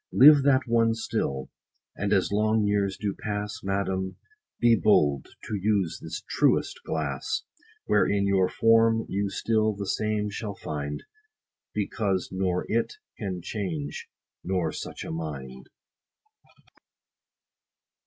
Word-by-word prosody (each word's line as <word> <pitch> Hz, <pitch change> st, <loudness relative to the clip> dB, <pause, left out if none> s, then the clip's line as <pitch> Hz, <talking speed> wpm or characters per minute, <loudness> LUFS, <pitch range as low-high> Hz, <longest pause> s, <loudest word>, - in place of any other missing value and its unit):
Live 145 Hz, +2 st, +8 dB
that 135 Hz, -1 st, +4 dB
one 115 Hz, -1 st, +3 dB
still! 70 Hz, -11 st, -2 dB, 0.4 s
and 100 Hz, +1 st, -2 dB
as 100 Hz, -2 st, +2 dB
long 110 Hz, +1 st, +2 dB
years 100 Hz, -2 st, +1 dB
do 100 Hz, -2 st, -2 dB
pass, 105 Hz, 0 st, -3 dB
Madam, 95 Hz, -1 st, -2 dB, 0.4 s
be 120 Hz, -1 st, +5 dB
bold 75 Hz, -11 st, +3 dB, 0.2 s
to -, -, -6 dB
use 100 Hz, -3 st, 0 dB
this -, -, -6 dB
truest -, -, +1 dB
glass; 70 Hz, -4 st, -2 dB, 0.4 s
Wherein 100 Hz, -1 st, +2 dB
your 95 Hz, -2 st, +3 dB
form 115 Hz, 0 st, +4 dB
you 100 Hz, +1 st, -1 dB
still 110 Hz, +1 st, +1 dB
the 100 Hz, 0 st, -4 dB
same 105 Hz, +1 st, -1 dB
shall 100 Hz, 0 st, -5 dB
find; 75 Hz, -4 st, -5 dB, 0.7 s
Because 100 Hz, -2 st, -1 dB
nor 95 Hz, -1 st, -1 dB
it 115 Hz, +1 st, 0 dB, 0.3 s
can 95 Hz, -5 st, -4 dB
change, 80 Hz, -10 st, -4 dB, 0.4 s
nor 90 Hz, -4 st, 0 dB
such -, -, -6 dB
a -, -, -6 dB
mind. 70 Hz, -6 st, -6 dB
100 Hz, 120 wpm, -27 LUFS, 90-110 Hz, 0.7 s, Live